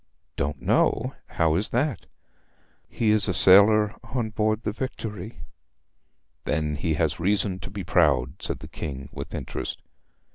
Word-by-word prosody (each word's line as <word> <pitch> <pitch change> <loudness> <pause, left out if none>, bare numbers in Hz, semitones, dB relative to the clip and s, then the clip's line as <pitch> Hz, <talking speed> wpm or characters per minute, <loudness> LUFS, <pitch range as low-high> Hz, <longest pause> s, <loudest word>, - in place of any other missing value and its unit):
'Don't 70 0 -2
know - - +1
how 80 -1 +1
is 95 +6 0
that?' 130 +1 -1 0.8
'He 110 -2 +1
is 105 0 +3
a 95 - 0
sailor 105 +3 +6
on 120 -3 -3
board 110 0 0
the 105 - -1
Victory.' 110 -3 -6 1.0
'Then 75 0 -1
he 80 -1 -1
has 75 -2 0
reason 95 +1 +1
to - - -8
be 100 0 -6
proud,' 75 -9 +2
said - - -3
the - - -8
King 70 -2 -6
with - - -7
interest. 65 0 -5
95 Hz, 145 wpm, -25 LUFS, 80-110 Hz, 1.0 s, sailor